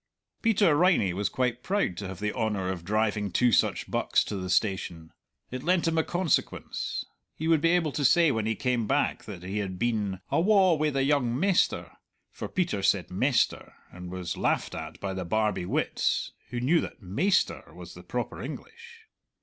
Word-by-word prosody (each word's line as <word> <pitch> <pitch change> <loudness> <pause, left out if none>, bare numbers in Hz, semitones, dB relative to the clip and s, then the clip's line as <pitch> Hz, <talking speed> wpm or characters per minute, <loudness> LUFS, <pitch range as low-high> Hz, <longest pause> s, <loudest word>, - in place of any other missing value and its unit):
Peter 205 -8 +4
Riney 165 - +3
was 100 +3 -1
quite 125 -1 -1
proud 195 - 0
to 100 - -5
have 95 -2 -7
the 105 0 -2
honour 105 -5 -1
of 90 -3 -4
driving 105 +1 0
two 125 +5 +3
such - - +2
bucks - - +1
to - - -5
the 95 -1 -4
station. 85 -3 -1 0.4
It 130 0 -4
lent 175 +1 +2
him 165 0 +2
a - - +2
consequence; 175 -2 -1 0.3
he 160 - -3
would 165 -2 +4
be 165 - +3
able 165 -4 +2
to 145 - -2
say 165 +3 +5
when 110 -3 -1
he 110 - 0
came 125 -3 0
back - - 0
that 85 - -8
he 95 +3 -3
had 95 -3 -4
been 105 -4 -1
"awa 190 0 +4
wi' 155 -1 +1
the 135 -2 0
young 135 -4 +1
mester" 190 +1 +1 0.4
for - - -6
Peter 170 - -1
said 95 -2 +1
"mester," 125 +7 0 0.2
and 90 0 -9
was 90 -2 -4
laughed - - 0
at - - -7
by 100 -1 -3
the 95 -1 -3
Barbie 105 0 0
wits - - 0 0.2
who 120 0 -3
knew 155 +8 +3
that - - -8
"maister" 145 - 0
was - - -11
the - - -11
proper - - -4
English. 465 0 -9
120 Hz, 190 wpm, -27 LUFS, 95-165 Hz, 0.4 s, say